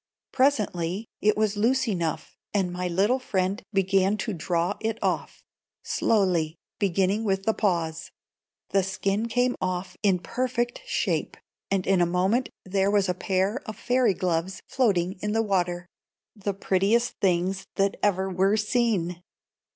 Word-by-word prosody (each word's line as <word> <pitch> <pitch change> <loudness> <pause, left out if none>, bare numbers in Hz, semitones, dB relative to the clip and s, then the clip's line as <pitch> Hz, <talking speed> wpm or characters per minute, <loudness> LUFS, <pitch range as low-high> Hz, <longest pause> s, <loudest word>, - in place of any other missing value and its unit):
Presently 210 -8 +1 0.2
it 210 0 +3
was 215 -1 +1
loose 245 +5 +2
enough, 170 -7 -2 0.2
and 185 -3 +1
my 180 0 -2
little 200 +9 +2
friend 195 -5 -1
began 195 0 +2
to 220 - -2
draw 170 +1 -1
it 225 0 -2
off, - - -2 0.4
slowly, 180 -7 +1 0.2
beginning 195 +2 +1
with 195 -2 0
the 220 - +2
paws. 165 -7 -1 0.6
The 195 - +3
skin 195 +3 -1
came 245 +2 +1
off 185 0 -2
in 195 -3 +3
perfect 240 +6 -2
shape, - - -1 0.3
and 195 -2 0
in 190 -2 +3
a 175 - +4
moment 190 +8 +1 0.2
there 195 +1 +1
was 200 -2 +2
a - - +2
pair 190 +7 0
of 215 - -6
fairy 245 -5 +2
gloves 180 +1 -2
floating 190 -7 +1
in 210 0 -1
the 225 0 +2
water, 180 -3 0 0.5
the 200 -2 -3
prettiest 200 +5 +1
things 190 +1 +1
that 195 0 +1
ever 190 -2 +2
were 190 +3 +2
seen. 210 -6 0
195 Hz, 145 wpm, -26 LUFS, 180-215 Hz, 0.6 s, a